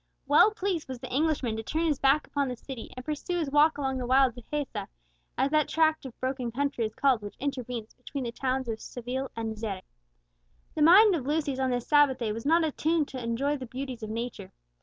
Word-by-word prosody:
Well 290 Hz, +9 st, +6 dB
pleased 390 Hz, -6 st, -2 dB
was 260 Hz, -1 st, -5 dB
the 240 Hz, -, -8 dB
Englishman 280 Hz, -5 st, +1 dB
to -, -, -2 dB
turn 315 Hz, +9 st, -1 dB
his 300 Hz, -4 st, +1 dB
back 275 Hz, +3 st, +3 dB
upon 285 Hz, -1 st, -1 dB
the 250 Hz, -, -3 dB
city, 245 Hz, 0 st, -9 dB
and 255 Hz, -, -7 dB
pursue 310 Hz, +4 st, -3 dB
his 310 Hz, -5 st, -2 dB
walk 295 Hz, +2 st, +4 dB
along 265 Hz, -2 st, -1 dB
the 245 Hz, -, -3 dB
wild 260 Hz, -1 st, +4 dB
Dehesa, 275 Hz, +4 st, -4 dB, 0.5 s
as 275 Hz, -, +1 dB
that 305 Hz, -1 st, +3 dB
tract 315 Hz, -3 st, +2 dB
of 245 Hz, -, -14 dB
broken 255 Hz, -2 st, -2 dB
country 275 Hz, -1 st, -1 dB
is 215 Hz, -, -14 dB
called 265 Hz, -5 st, +3 dB
which 205 Hz, 0 st, -8 dB
intervenes 250 Hz, -5 st, -4 dB
between 260 Hz, +2 st, -6 dB
the 235 Hz, -, -3 dB
towns 260 Hz, +1 st, -2 dB
of 220 Hz, -1 st, -4 dB
Seville 255 Hz, +2 st, -4 dB
and 225 Hz, -1 st, -3 dB
Xeres. 210 Hz, -4 st, -4 dB, 0.9 s
The 310 Hz, -, -3 dB
mind 385 Hz, +7 st, +8 dB
of 280 Hz, -7 st, -2 dB
Lucius 290 Hz, -3 st, 0 dB
on 260 Hz, -1 st, +1 dB
this 245 Hz, -1 st, -1 dB
Sabbath 290 Hz, -3 st, +5 dB
day 230 Hz, -4 st, -2 dB
was 230 Hz, +5 st, -4 dB
not 330 Hz, +2 st, +4 dB
attuned 315 Hz, 0 st, 0 dB
to 255 Hz, -2 st, -6 dB
enjoy 270 Hz, +6 st, 0 dB
the 255 Hz, -2 st, -7 dB
beauties 255 Hz, 0 st, -6 dB
of 215 Hz, -, -5 dB
nature. 235 Hz, +2 st, -5 dB
265 Hz, 220 wpm, -28 LUFS, 245-295 Hz, 0.9 s, mind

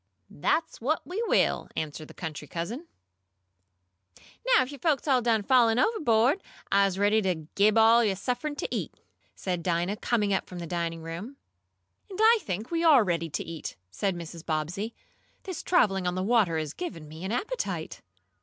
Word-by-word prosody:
"That's 320 Hz, -5 st, -1 dB
what 295 Hz, +7 st, 0 dB
we 375 Hz, +6 st, -3 dB
will," -, -, +2 dB
answered 155 Hz, 0 st, -4 dB
the -, -, -14 dB
country 155 Hz, -3 st, -6 dB
cousin. 215 Hz, -, -5 dB, 1.7 s
"Now -, -, +5 dB
if 260 Hz, -, -8 dB
yo' 285 Hz, -, -9 dB
folks 300 Hz, 0 st, +1 dB
am 275 Hz, -, +4 dB
all 255 Hz, -, +3 dB
done 225 Hz, -3 st, +2 dB
fallin' 235 Hz, -1 st, +4 dB
ovahbo'd 255 Hz, -, +3 dB, 0.3 s
I'se 195 Hz, -1 st, +3 dB
ready 205 Hz, +2 st, +3 dB
t' 180 Hz, -5 st, -1 dB
gib 210 Hz, +2 st, +4 dB
yo' 225 Hz, -, +6 dB
all 225 Hz, -3 st, +5 dB
suffin 255 Hz, +8 st, -3 dB
t' -, -, -3 dB
eat," -, -, -3 dB, 0.4 s
said 180 Hz, -2 st, -3 dB
Dinah, 175 Hz, +4 st, 0 dB
coming 210 Hz, -3 st, +1 dB
up 190 Hz, -, -1 dB
from 180 Hz, -, -9 dB
the 170 Hz, -, -5 dB
dining 165 Hz, -1 st, -3 dB
room. 180 Hz, +12 st, -7 dB, 0.7 s
"And 380 Hz, -, -8 dB
I 450 Hz, +1 st, +6 dB
think 215 Hz, -, -4 dB
we 335 Hz, 0 st, 0 dB
are 295 Hz, -8 st, +7 dB
ready 170 Hz, -3 st, -1 dB
to 145 Hz, -, -3 dB
eat," 165 Hz, -1 st, -7 dB, 0.2 s
said 195 Hz, -, -1 dB
Mrs. 170 Hz, -1 st, -8 dB
Bobbsey. 175 Hz, +8 st, -3 dB, 0.5 s
"This 370 Hz, -5 st, -5 dB
traveling 195 Hz, -, +2 dB
on 180 Hz, -, -1 dB
the 185 Hz, -, -1 dB
water 205 Hz, -6 st, +3 dB
has 155 Hz, -2 st, -3 dB
given 170 Hz, -, -6 dB
me 160 Hz, +3 st, -10 dB
an 190 Hz, -, -3 dB
appetite." 230 Hz, -, -3 dB
205 Hz, 180 wpm, -28 LUFS, 170-255 Hz, 1.7 s, are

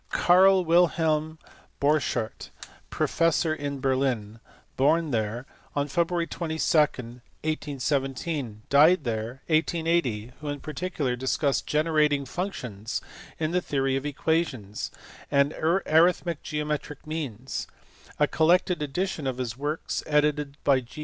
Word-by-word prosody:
Carl 185 Hz, +1 st, +5 dB
Wilhelm 160 Hz, -2 st, +2 dB, 0.4 s
Borchardt, 140 Hz, -6 st, 0 dB, 0.4 s
professor 165 Hz, -1 st, +1 dB
in 145 Hz, -2 st, -4 dB
Berlin, 130 Hz, -5 st, 0 dB, 0.4 s
born 155 Hz, +3 st, +2 dB
there 115 Hz, +2 st, -2 dB, 0.3 s
on 145 Hz, 0 st, 0 dB
Feb. 170 Hz, +3 st, 0 dB
22, 160 Hz, -2 st, -4 dB
1817, 140 Hz, +1 st, -1 dB
and 110 Hz, 0 st, -15 dB
died 155 Hz, +4 st, +6 dB
there 115 Hz, +2 st, -4 dB
in 155 Hz, -, +5 dB
1880, 160 Hz, -9 st, 0 dB
who 150 Hz, -, -6 dB
in 145 Hz, 0 st, -3 dB
particular 155 Hz, -5 st, -3 dB
discussed 130 Hz, +2 st, 0 dB
generating 150 Hz, -2 st, +2 dB
functions 125 Hz, -, -4 dB, 0.4 s
in 155 Hz, 0 st, -1 dB
the 180 Hz, +1 st, +1 dB
theory 135 Hz, -4 st, 0 dB
of 135 Hz, -, -2 dB
equations, 145 Hz, -9 st, -1 dB, 0.4 s
and 140 Hz, +1 st, +3 dB
arithmetic 170 Hz, -1 st, +2 dB
geometric 150 Hz, -1 st, -4 dB
means: 135 Hz, -6 st, -4 dB, 0.5 s
a 150 Hz, -, +5 dB
collected 170 Hz, +2 st, +2 dB
edition 150 Hz, +1 st, -2 dB
of 130 Hz, -2 st, -2 dB
his 120 Hz, -3 st, -3 dB
works, 145 Hz, +4 st, -3 dB
edited 150 Hz, -1 st, +1 dB
by 140 Hz, -2 st, +4 dB
G. 125 Hz, +4 st, -12 dB
150 Hz, 115 wpm, -26 LUFS, 130-160 Hz, 0.5 s, died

